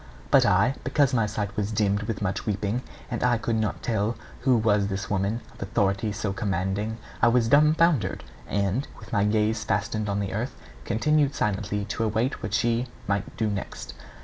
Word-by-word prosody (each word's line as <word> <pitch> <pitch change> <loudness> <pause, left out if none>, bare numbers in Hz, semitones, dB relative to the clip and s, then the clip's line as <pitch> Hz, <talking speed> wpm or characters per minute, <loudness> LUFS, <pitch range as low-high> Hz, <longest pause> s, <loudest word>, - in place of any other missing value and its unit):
But - - +6
I, 100 +8 +4
because 140 0 +2
my 115 -4 +2
sight 105 -1 -3
was 105 0 -1
dimmed 100 -1 +1
with 105 -1 -3
much 95 +2 -2
weeping, 105 +3 -1 0.3
and 120 - -2
I 125 -1 +3
could 115 0 -1
not 110 -1 -2
tell 110 0 0 0.2
who 130 -2 +3
was 105 -2 +2
this 100 0 -4
woman 100 +4 0
of - - -16
authority 100 +2 0
so 105 -1 -2
commanding 100 +2 -1 0.2
I 120 - +6
was 115 -1 +3
dumfoundered, 150 0 +3 0.2
and, 100 +7 0
with 115 - -12
my 100 -2 +3
gaze 110 +1 +1
fastened 105 +1 -1
on 100 0 0
the 100 -2 -2
earth, 115 +6 -3 0.3
continued 145 +4 +2
silently 105 0 -1
to 115 +2 -2
await 110 +4 0
what - - -2
she 120 +1 +1 0.2
might 100 0 -2
do 110 - +1
next. 100 - -5
105 Hz, 180 wpm, -26 LUFS, 100-115 Hz, 0.3 s, But